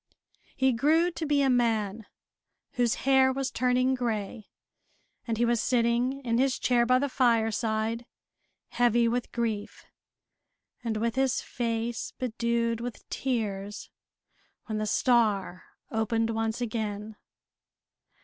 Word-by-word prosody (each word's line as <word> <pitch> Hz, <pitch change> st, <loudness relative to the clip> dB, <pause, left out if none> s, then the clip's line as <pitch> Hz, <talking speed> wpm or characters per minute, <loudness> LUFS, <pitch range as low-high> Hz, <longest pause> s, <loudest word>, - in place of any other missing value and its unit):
He 265 Hz, -1 st, +2 dB
grew 315 Hz, +8 st, +3 dB
to 325 Hz, -2 st, -4 dB
be 285 Hz, -1 st, +3 dB
a 270 Hz, -, +3 dB
man, 225 Hz, -3 st, 0 dB, 0.6 s
whose 240 Hz, -2 st, +1 dB
hair 265 Hz, -1 st, +5 dB
was 270 Hz, 0 st, -2 dB
turning 255 Hz, +1 st, +2 dB
gray, 225 Hz, -4 st, -3 dB, 0.8 s
and 225 Hz, -1 st, -1 dB
he 240 Hz, -, +2 dB
was 235 Hz, -2 st, +1 dB
sitting 245 Hz, +2 st, +1 dB
in 230 Hz, 0 st, +1 dB
his 265 Hz, 0 st, +2 dB
chair 240 Hz, -1 st, +2 dB
by 255 Hz, +1 st, +5 dB
the 285 Hz, +2 st, 0 dB
fireside, 225 Hz, -2 st, 0 dB, 0.6 s
heavy 240 Hz, -1 st, +3 dB
with 245 Hz, +1 st, -2 dB
grief, 225 Hz, -3 st, -3 dB, 1.0 s
and 225 Hz, -2 st, -1 dB
with 230 Hz, +1 st, 0 dB
his 265 Hz, -1 st, +1 dB
face 230 Hz, -1 st, -3 dB
bedewed 235 Hz, -1 st, -1 dB
with 245 Hz, -1 st, -7 dB
tears, 210 Hz, -5 st, -3 dB, 0.7 s
when 215 Hz, -1 st, -3 dB
the 215 Hz, -, -2 dB
star 210 Hz, -6 st, +1 dB, 0.3 s
opened 225 Hz, +1 st, 0 dB
once 225 Hz, +1 st, -2 dB
again. 215 Hz, -2 st, -3 dB
235 Hz, 120 wpm, -28 LUFS, 220-250 Hz, 1.0 s, hair